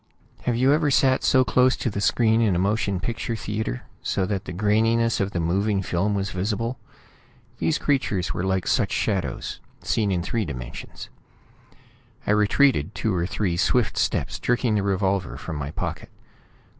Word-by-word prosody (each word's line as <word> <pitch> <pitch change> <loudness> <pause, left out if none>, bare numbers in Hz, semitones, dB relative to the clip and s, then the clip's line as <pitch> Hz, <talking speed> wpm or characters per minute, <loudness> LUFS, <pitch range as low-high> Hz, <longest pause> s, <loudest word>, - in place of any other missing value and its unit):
Have 120 - +1
you 130 +4 +4
ever 150 -1 +2
sat 130 -1 +3 0.2
close 130 +1 +3
to 120 - -2
the 100 - -3
screen 115 +1 +3
in 105 -5 +2
a - - +1
motion 100 0 0
picture 115 +3 -3
theatre, 105 - -3 0.2
so 95 - 0
that 95 0 -3
the - - -6
graininess 110 +4 +2
of 100 - 0
the 90 - -3
moving 95 +4 0
film 95 +4 0
was 100 -1 -2
visible? 110 +6 -2 0.8
These 160 - +1
creatures 110 - 0
were 85 - -3
like 95 -1 0
such - - +1
shadows, - - -2 0.2
seen 105 -3 +1
in 90 -2 0
three 110 +4 -1
dimensions. 65 -8 -7 1.2
I - - +1
retreated 105 - +3
two 110 - 0
or 85 -1 0
three 90 -4 -1
swift 115 +5 +2
steps, - - -1
jerking 120 -2 +1
the 105 - +2
revolver 95 -1 0
from 80 - -6
my 70 -1 -4
pocket. - - -5
105 Hz, 165 wpm, -24 LUFS, 95-115 Hz, 1.2 s, you